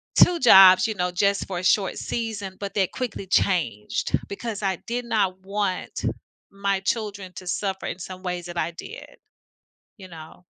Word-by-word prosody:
2 355 -1 +6
jobs, 190 -3 +8
you 220 - -3
know, 180 -2 -1
just 200 +3 +1
for 185 -2 -4
a 180 - -5
short 195 -1 +2
season, 210 -5 -4
but 200 -1 -5
they 195 -2 +2
quickly 230 -2 -5
changed 170 - 0
because 210 +1 -5
I 190 -2 0
did 245 +1 -3
not 200 -5 0
want 195 -1 -3 0.5
my 195 -1 -1
children 200 -3 -3
to 185 - -9
suffer 190 +1 -2
in - - -4
some 185 +1 -8
ways 180 -1 -4
that 175 -1 -6
I 170 - -1
did, 435 - -10 0.8
you 190 - -11
know, 165 +1 -13
195 Hz, 170 wpm, -24 LUFS, 180-210 Hz, 0.8 s, jobs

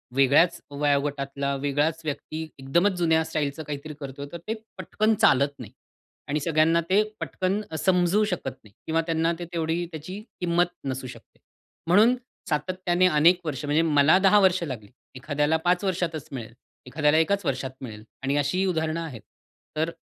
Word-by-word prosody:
वेगळ्याच 140 +6 +4
वयोगटातला 140 -1 -1
वेगळाच 145 +4 0
व्यक्ती 155 +2 -4 0.2
एकदमच 170 +10 +2
जुन्या 160 -2 +3
स्टाईलचं 155 -1 -3
काहीतरी 150 +1 -6
करतोय 140 0 -7
तर 170 - -6
ते 220 - 0 0.2
पटकन 215 +1 0
चालत 140 +1 +3
नाही. 110 -3 -9 0.6
आणि 150 +1 0
सगळ्यांना 160 +2 +2
ते 195 +3 +5 0.2
पटकन 190 +2 -1
अ, - - -4
समजू 180 +4 +2
शकत 180 -9 -2
नाही. 105 - -18 0.2
किंवा 165 +1 +2
त्यांना 165 +1 +1
ते 175 - -4
तेवढी 165 +1 -1
त्याची 180 +6 -7 0.2
किंमत 175 0 +1
नसू 130 -1 -3
शकते. - - -14 0.5
म्हणून 215 +8 +5 0.3
सातत्याने 180 +4 +1
अनेक 170 +2 +4
वर्ष 150 -2 -3
म्हणजे 150 +3 +2
मला 155 +1 +5
10 200 +2 +5
वर्ष 185 -2 +3
लागली. 120 -10 -6 0.3
एखाद्याला 150 +4 0
5 180 +2 +2
वर्षातच 170 -5 -2
मिळेल. 115 -4 -7 0.3
एखाद्याला 150 +3 +2
एकाच 200 +3 +1
वर्षात 130 -1 -2
मिळेल. 110 -4 -8 0.2
आणि 140 +1 0
अशीही 145 +7 +1
उदाहरणं 160 -2 -1
आहेत. 140 -10 -7 0.6
तर 160 +2 0
160 Hz, 155 wpm, -25 LUFS, 140-175 Hz, 0.6 s, ते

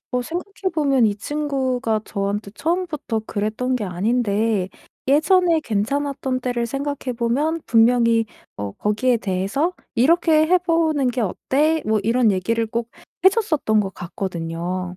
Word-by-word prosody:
뭐 250 0 0
생각해 375 +5 -4
보면 275 -6 +3
이 205 -1 -1
친구가 260 -4 -1
저한테 200 +1 -3
처음부터 320 -9 -2
그랬던 220 +5 -1
게 215 - -3
아닌데 205 +1 0 0.4
예전에 330 +3 +4
괜찮았던 260 +3 -1
때를 240 -1 -1
생각해 275 0 -3
보면 290 +8 0
분명히 230 0 +4 0.3
뭐 100 -1 -4
거기에 235 +4 +1
대해서 210 - -1 0.2
"이렇게 315 +4 +4
해 365 +2 +4
보는 325 -6 +1
게 245 0 -2 0.3
어때?" 310 +4 +3
뭐 215 0 +2
이런 230 +1 +3
얘기를 225 +4 0
꼭 230 +1 -3 0.4
해 - - +11
줬었던 315 - +1
것 195 -3 -1
같거든요. 175 0 -4
245 Hz, 295 characters per minute, -21 LUFS, 210-300 Hz, 0.4 s, 해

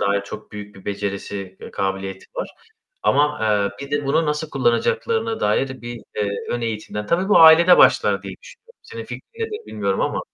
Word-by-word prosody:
dair 100 0 +1
çok 105 +2 -10
büyük 105 0 -9
bir 95 - -15
becerisi 100 -1 -5
ve - - -9
kabiliyeti 95 0 -4
var. - - -4 0.5
Ama, 150 +1 +2 0.4
eee, 140 - -6
bir - - -17
de 145 0 -1
bunu 160 +4 +2
nasıl 150 +1 -2
kullanacaklarına 220 - 0
dair 130 +5 0
bir, 120 -1 -7 0.2
eee, 105 -1 0 0.2
ön 120 - -1
eğitimden, 110 -2 -4
tabii 180 - 0
bu 210 - +6
ailede 165 +2 +8
başlar - - +4
diye - - -7
düşünüyorum. 470 0 -17
Senin 460 0 -8
fikrin - - -8 0.2
nedir 440 0 -7
bilmiyorum 100 -2 -2
ama? - - -1
120 Hz, 180 wpm, -21 LUFS, 100-165 Hz, 0.5 s, ailede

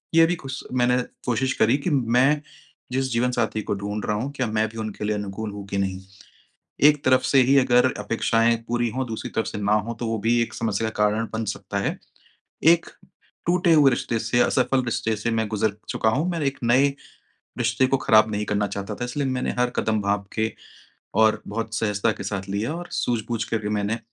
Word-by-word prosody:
ये 165 0 +7
भी 175 +2 0
खुस 135 -3 -7
मैंने 125 0 +3 0.3
कोशिश 125 +2 0
करी 115 +5 +4
कि 145 +5 -2
मैं 135 +1 +3 0.5
जिस 130 +1 -1
जीवनसाथी 120 -2 0
को - - -3
ढूँढ 105 +1 -4
रहा 105 - 0
हूँ 130 +6 -3
क्या 130 -3 -1
मैं 110 0 0
भी 115 - -12
उनके 110 -2 -5
लिए 105 0 0
अनुकूल 105 +1 -5
हूँ 100 -1 -8
कि 100 - -3
नहीं। 95 -1 -1 0.9
एक 150 -1 0
तरफ 130 0 +5
से 130 +1 +4
ही 140 - +6
अगर 125 0 +4
अपेक्षाएँ 115 +2 +2
पूरी 120 0 0
हों 130 +2 -2
दूसरी 110 -1 -5
तरफ़ 110 - -1
से - - -5
ना 100 +1 +2
हों 115 - -2
तो 120 - -5
वो 115 0 -1
भी 120 +3 +2
एक 115 - -2
समस्या 110 -1 -1
का 105 -1 -1
कारण 105 +2 +1
बन 110 0 -2
सकता - - -6
है। - - -2 0.8
एक 170 0 -1 0.6
टूटे 175 0 +3
हुए 150 -3 +6
रिश्ते 120 -1 -1
से, 115 +2 0
असफल 130 0 +2
रिश्ते 115 -1 -1
से 110 +3 -2
मैं 110 -1 0
गुज़र 105 -1 0
चुका 110 - +1
हूँ, 150 +10 0
मैं 170 -2 -2
एक 140 -1 -1
नए 130 +4 +4 0.7
रिश्ते 120 +2 +2
को 135 - +2
ख़राब 110 -3 +4
नहीं 105 0 -2
करना 105 0 0
चाहता 100 +1 -5
था। 120 - -4
इसलिए 135 +3 -2
मैंने 130 -1 -1
हर 125 0 +2
कदम 110 -1 +1
भाँप 100 0 -1
के 110 0 0 0.7
और 110 -1 +4
बहुत 115 +1 -4
सहजता 110 -1 +1
के 100 - -8
साथ 100 -1 -4
लिया 105 +9 -2
और 175 +1 -7
सूझ-बूझ 115 -1 -1
करके 110 -2 -2
मैंने 105 +2 -1
115 Hz, 210 wpm, -24 LUFS, 105-130 Hz, 0.9 s, ये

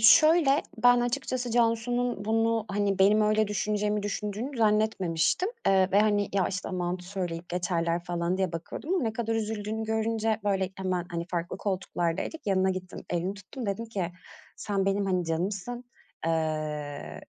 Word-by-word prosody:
şöyle, 305 +5 +6 0.2
ben 245 0 +7
açıkçası 245 0 -1
Cansu’nun 235 -1 +1
bunu, 225 0 +2
hani, 200 -1 0
benim 205 +3 +5
öyle 215 0 +3
düşüneceğimi, 210 +1 0
düşündüğünü 210 +6 -3
zannetmemiştim, 210 - +2 0.2
eee, 190 -1 +5
ve, 200 - +6
hani, 205 -1 +2
“Ya, 195 -2 +2
işte, 185 -1 -4
aman, 180 -1 -1
söyleyip 175 -2 -4
geçerler.” 175 -1 -1
falan 175 +1 -1
diye 190 -3 0
bakıyordum 175 - -4
ama 365 - +1
ne 225 -2 0
kadar 225 0 -1
üzüldüğünü 220 0 -2
görünce 220 0 0
böyle 195 -2 +1
hemen, 185 -2 -1
hani, 170 0 -2
farklı 175 0 -2
koltuklardaydık, 185 - -2
yanına 190 -1 +3
gittim, 185 -1 -5
elini 175 +3 -1
tuttum. 205 +4 -8
Dedim 200 +4 -2
ki: 185 -6 -3 0.4
“Sen 200 -2 -1
benim, 195 0 +1
hani, 180 -2 +1
canımsın. 195 +9 -2 0.4
Eee, 150 - -2
200 Hz, 150 wpm, -28 LUFS, 180-225 Hz, 0.4 s, ben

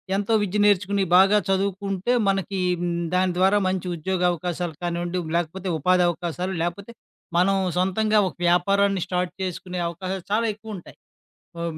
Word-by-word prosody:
ఎంతో 205 +3 0
విద్య 205 +1 -1
నేర్చుకొని, 200 0 +2
బాగా 195 +2 +6
చదువుకుంటే, 195 +3 0 0.2
మనకి 195 0 -1 0.3
మ్ 175 - -1 0.2
దాని 185 -1 +2
ద్వారా 190 +3 +4
మంచి 185 -1 -2
ఉద్యోగ 180 +3 -2
అవకాశాలు 175 -1 -4
కానివ్వండి, 175 +1 -2 0.2
లేకపోతే 180 +3 -3
ఉపాధి 180 +3 +3
అవకాశాలు 175 +2 -3
లేపోతే, 195 +6 -4 0.5
మనం 195 +2 +3 0.2
సొంతంగా 210 +4 +2
ఒక - - -7
వ్యాపారాన్ని 195 +2 +2
స్టార్ట్ 180 -1 -1
చేసుకునే 180 0 -5
అవకాశాలు 185 +2 -5
చాలా 225 +2 +2
ఎక్కువు 220 +1 -10
ఉంటాయి. 175 - -14 0.6
అబ - - -3
185 Hz, 145 wpm, -24 LUFS, 175-200 Hz, 0.6 s, బాగా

